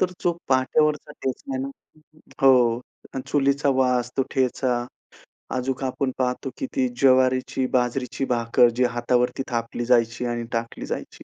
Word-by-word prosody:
तर 185 -1 +2
जो 175 - +3 0.2
पाट्यावरचा 150 +3 +2
ठेचा 275 - -5
आहे 265 - -2
ना 275 - -3 0.8
हो, 125 -3 +5 0.5
चुलीचा 140 0 +1
वास, 125 -1 +1
तो 135 - +3
ठेचा 125 -2 +1 0.7
अजून 130 +1 -2
आपण 130 +1 -1
पाहतो, 125 +1 -1
की 270 - -3
ती 265 -2 +2
ज्वारीची, 130 0 +3
बाजरीची 125 +2 -1
भाकर 120 -1 +3
जी 125 - +3
हातावरती 125 +2 +1
थापली 115 0 -2
जायची 120 -1 +2
आणि 120 -1 -2
टाकली 115 0 -3
जायची. - - -6
130 Hz, 140 wpm, -24 LUFS, 120-135 Hz, 0.8 s, हो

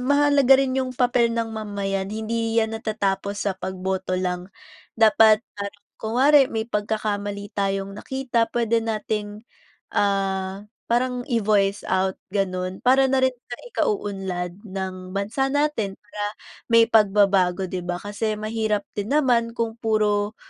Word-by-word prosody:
mahalaga 285 0 +5
rin 265 -1 +1
yung 255 -1 -4
papel 245 -1 +3
ng 230 -1 -2
mamayan. 200 -3 -3
Hindi 225 +1 -2
'yan 220 -1 +2
natatapos 200 -2 -2
sa 200 - +1
pagboto 190 0 -3
lang. 180 0 -2 0.5
Dapat 220 0 +5
parang 205 0 -7 0.2
kunwari, 265 +7 +5
may 220 0 -2
pagkakamali 205 -2 -3
tayong 195 0 -1
nakita 245 +1 -1
pwede 230 -1 +2
nating, 215 -1 -3 0.5
ah, 195 0 0 0.2
parang 250 0 +1
i-voice 205 -3 +2
out, 190 0 +1 0.2
ganun. 185 -2 -2
Para 265 +1 +5
na 265 - +3
rin 260 -1 +3
sa 240 - -5 0.2
ikauunlad 190 - -2
ng 185 -1 -6
bansa 215 +7 0
natin 285 -9 0
para 210 0 -7 0.5
may 230 0 +7
pagbabago, 195 -3 +3
'di 180 -1 -3
ba? 175 - -1
Kasi 210 +1 -2
mahirap 215 -1 -1
din 205 +4 -3
naman 240 -5 +2
kung 230 -1 -2
puro 210 -1 +1
210 Hz, 130 wpm, -23 LUFS, 195-230 Hz, 0.5 s, may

